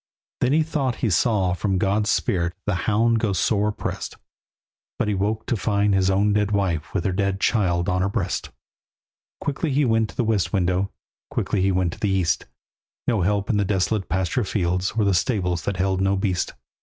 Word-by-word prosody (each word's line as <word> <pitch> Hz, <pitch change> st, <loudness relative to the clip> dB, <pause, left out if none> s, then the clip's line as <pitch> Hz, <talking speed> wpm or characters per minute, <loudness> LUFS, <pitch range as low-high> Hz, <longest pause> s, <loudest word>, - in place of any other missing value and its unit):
Then 125 Hz, -, +2 dB
he 155 Hz, +2 st, +4 dB
thought 140 Hz, -6 st, -1 dB
he 110 Hz, -, +1 dB
saw 95 Hz, -1 st, +2 dB
from 95 Hz, +2 st, 0 dB
God's 100 Hz, +3 st, +1 dB
spirit 85 Hz, -6 st, +1 dB
The 100 Hz, -, 0 dB, 0.2 s
hound 115 Hz, +2 st, +3 dB
go 105 Hz, -3 st, 0 dB
sore 105 Hz, +3 st, +1 dB
oppressed, 105 Hz, -, -4 dB, 0.8 s
But -, -, 0 dB
he 105 Hz, -, +1 dB
woke 105 Hz, +3 st, -1 dB
to -, -, 0 dB
find 100 Hz, -1 st, +1 dB
his 95 Hz, -1 st, +3 dB
own 100 Hz, +2 st, +2 dB
dead 105 Hz, -1 st, +1 dB
wife 90 Hz, -6 st, -1 dB
With 90 Hz, -, 0 dB
her 95 Hz, -, +2 dB
dead 100 Hz, +1 st, 0 dB
child 90 Hz, -7 st, +1 dB
on 90 Hz, 0 st, +1 dB
her 100 Hz, -, +1 dB
breast. 100 Hz, -3 st, -2 dB, 0.9 s
Quickly 145 Hz, +2 st, -2 dB
he 140 Hz, +2 st, +2 dB
went 115 Hz, -2 st, +2 dB
to -, -, -12 dB
the -, -, +1 dB
west 110 Hz, -4 st, +1 dB
window, 95 Hz, 0 st, 0 dB, 0.4 s
Quickly 100 Hz, -, -1 dB
he 95 Hz, +1 st, +3 dB
went 90 Hz, -2 st, 0 dB
to -, -, -12 dB
the 105 Hz, -, 0 dB
east; 85 Hz, -9 st, +1 dB, 0.6 s
No 110 Hz, -5 st, +2 dB
help 100 Hz, +2 st, +1 dB
in 110 Hz, -, +1 dB
the 100 Hz, -, +2 dB
desolate 100 Hz, +1 st, 0 dB
pasture 95 Hz, +8 st, 0 dB
fields, 90 Hz, -2 st, -1 dB
Or 110 Hz, -, +3 dB
the 100 Hz, -, +3 dB
stables 90 Hz, -3 st, 0 dB
that 100 Hz, -2 st, -2 dB
held 95 Hz, 0 st, 0 dB
no 95 Hz, +1 st, +2 dB
beast. 95 Hz, -2 st, -1 dB
100 Hz, 200 wpm, -23 LUFS, 95-105 Hz, 0.9 s, he